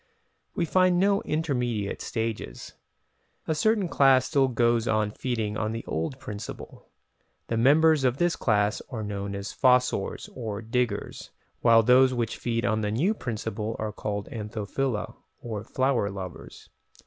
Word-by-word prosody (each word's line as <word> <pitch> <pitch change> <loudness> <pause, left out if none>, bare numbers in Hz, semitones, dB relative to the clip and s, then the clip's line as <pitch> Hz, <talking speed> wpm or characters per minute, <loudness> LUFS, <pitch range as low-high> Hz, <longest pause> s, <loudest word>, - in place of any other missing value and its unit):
We 175 - +1
find 185 +1 +3
no 200 +1 +3
intermediate 125 -10 -2
stages. 115 -1 -4 0.7
A 160 - +1
certain 210 +4 +2
class 135 -5 +4
still 140 -3 +2
goes 120 -1 +1
on 110 -1 +1
feeding 110 -3 -2
on 110 0 -1
the 115 - -5
old 80 +11 -3
principle. 105 -4 -8 0.6
The 115 - 0
members 150 +4 +5
of 125 0 +2
this 175 +1 +2
class 105 +1 +1
are 110 -4 -4
known 100 -1 -4
as 100 +1 -5
"fossors" 125 -6 +2
or 110 -5 -5
diggers, 115 -2 -2 0.3
while 115 -1 +5
those 130 +2 +5
which 120 -2 -2
feed 115 0 -1
on 110 -1 +1
the 105 - -1
new 150 - +1
principle 110 - -4
are 110 -1 -3
called 100 -1 -4
"Anthophila" 110 +2 -3 0.2
or 110 -3 -5
flower 130 -3 0
lovers. 95 -2 -9
115 Hz, 145 wpm, -26 LUFS, 105-135 Hz, 0.7 s, members